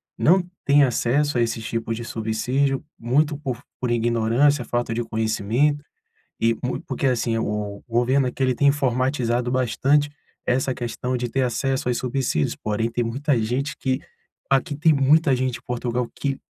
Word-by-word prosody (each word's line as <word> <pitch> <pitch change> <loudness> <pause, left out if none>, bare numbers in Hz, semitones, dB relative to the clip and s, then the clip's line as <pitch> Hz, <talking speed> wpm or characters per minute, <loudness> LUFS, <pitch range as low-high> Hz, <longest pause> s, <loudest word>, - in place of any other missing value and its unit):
não 180 +2 +3 0.2
têm 145 +1 +5
acesso 135 +2 +1
a - - +3
esses 115 -1 -1
tipos 115 0 -2
de 120 - -5
subsídio, 125 +5 -1 0.2
muito 145 +6 +1
por 130 -5 -4 0.2
por 125 - -1
ignorância, 120 +4 +2
falta 120 0 -2
de 120 +1 -1
conhecimento 110 +6 0 0.6
e 115 0 +3
mu 125 - -2
porque 135 +1 -1
assim, 120 -3 +1
o 105 -2 -3
governo 125 +3 +2
aqui 125 +2 -3
ele 130 -1 +2
tem 140 - +2
informatizado 130 -3 +1
bastante 135 +4 +2 0.3
essa 130 +1 +1
questão 125 +1 -3
de 120 0 -2
ter 135 - 0
acesso 130 +1 -1
aos 125 - +1
subsídios, 125 - -1
porém 110 +2 -1
tem 120 +1 -1
muita 135 +3 0
gente 130 +5 -1
que 130 0 -1 0.5
aqui 135 +2 +2
tem 160 +2 +4
muita 145 +1 +4
gente 130 -1 -1
em - - -22
Portugal 125 0 -2
que 135 -2 -1
125 Hz, 165 wpm, -23 LUFS, 115-140 Hz, 0.6 s, têm